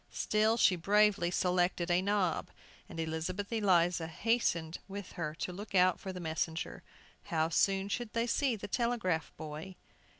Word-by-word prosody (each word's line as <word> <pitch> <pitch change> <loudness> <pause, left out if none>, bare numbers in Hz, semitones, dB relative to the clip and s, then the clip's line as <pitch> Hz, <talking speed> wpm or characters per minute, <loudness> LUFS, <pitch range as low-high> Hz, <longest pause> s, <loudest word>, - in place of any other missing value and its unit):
Still 215 +2 +2
she 195 -4 +5
bravely 200 0 +3
selected 180 -1 +1
a 175 +1 +3
knob, 195 -3 0 0.4
and 165 - -7
Elizabeth 165 +6 -3
Eliza 175 -6 +2
hastened 170 -4 0
with 200 -1 -7
her 155 -3 -4
to 180 - -4
look 200 +2 -7
out 185 -1 +4
for 190 - -5
the 185 - -7
messenger. 160 0 -3 0.4
How 160 -4 0
soon 195 +3 +2
should 230 +2 -3
they 230 0 +1
see 250 +1 +1
the 205 - -7
telegraph 205 -8 0
boy? 155 +4 -7
185 Hz, 155 wpm, -32 LUFS, 165-205 Hz, 0.4 s, she